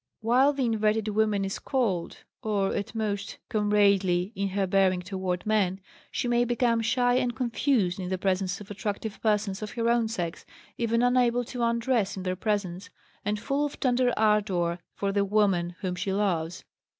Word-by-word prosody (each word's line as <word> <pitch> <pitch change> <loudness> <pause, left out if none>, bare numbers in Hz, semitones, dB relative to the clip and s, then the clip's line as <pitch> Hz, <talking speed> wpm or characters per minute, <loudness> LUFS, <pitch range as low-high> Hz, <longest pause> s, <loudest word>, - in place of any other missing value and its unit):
While 255 +6 +4
the 270 -2 0
inverted 220 -1 +1
woman 210 -2 +1
is 195 - -4
cold, 220 -11 -1 0.2
or, 205 -3 0
at 200 +2 -4
most, 205 -2 -3
comradely 200 -3 +2
in 200 0 -1
her 195 0 0
bearing 185 -1 +2
toward 185 -1 -3
men, 200 -3 +1 0.3
she - - -2
may 240 0 +3
become 240 -1 +1
shy 245 +2 +2
and 245 -1 0
confused 235 -6 +1
in 180 -1 -4
the 185 - -1
presence 185 -1 0
of 205 0 -10
attractive 205 +1 -4
persons 210 -2 0
of 215 - -5
her 230 -1 -1
own 235 -1 +2
sex, 175 -7 -4 0.3
even 230 0 +1
unable 245 -1 +3
to 245 +1 -6
undress 235 -3 +1
in 190 - -5
their 185 0 -1
presence, 195 -2 -2 0.3
and 210 +1 -1
full 275 +6 -1
of 290 - -4
tender 250 -1 +2
ardor 195 -5 +2 0.2
for 200 -1 -1
the 200 0 +2
woman 195 -4 +1
whom 185 -2 -2
she 185 +2 -2
loves. 185 -4 -1
210 Hz, 175 wpm, -27 LUFS, 190-235 Hz, 0.3 s, While